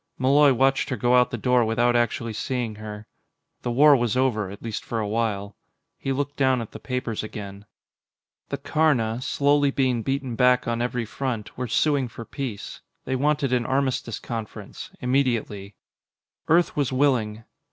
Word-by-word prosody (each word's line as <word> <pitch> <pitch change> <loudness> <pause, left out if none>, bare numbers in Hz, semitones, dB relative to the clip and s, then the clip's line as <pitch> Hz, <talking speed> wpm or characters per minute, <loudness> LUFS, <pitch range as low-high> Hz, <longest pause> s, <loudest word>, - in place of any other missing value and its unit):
Malloy 140 +2 +5
watched 135 +2 +2
her 130 - -1
go 120 +2 +2
out 125 0 +4
the 120 - -4
door 125 +1 +3
without 120 +2 +2
actually 115 -1 0
seeing 120 0 -2
her. 105 0 -8 0.6
The - - -3
war 145 +4 +6
was 120 -2 0
over 115 -7 +1
at 100 +2 -10
least 115 -2 -4
for 115 - -4
a 105 - -2
while. 105 -2 -2 0.4
He 135 - -4
looked 145 +1 -2
down 130 -2 +3
at 115 - -6
the - - -9
papers 125 -4 -3
again. 100 -1 -8 0.8
The - - -2
Karna, 125 -7 +1
slowly 145 +1 +2
being 130 -3 +1
beaten 135 0 -2
back 125 0 +3
on 115 0 -1
every 125 -1 -1
front, 120 -2 -4
were 125 0 -3
suing 140 +3 +1
for 115 0 -9
peace. 125 -7 -6 0.2
They 130 - -1
wanted 140 0 +1
an 120 -1 +1
armistice 130 -4 -1
conference 110 -3 -7
immediately. 120 -6 -1 0.7
Earth 170 +2 +3
was 145 -3 0
willing. 120 -5 +1
125 Hz, 165 wpm, -24 LUFS, 110-135 Hz, 0.8 s, war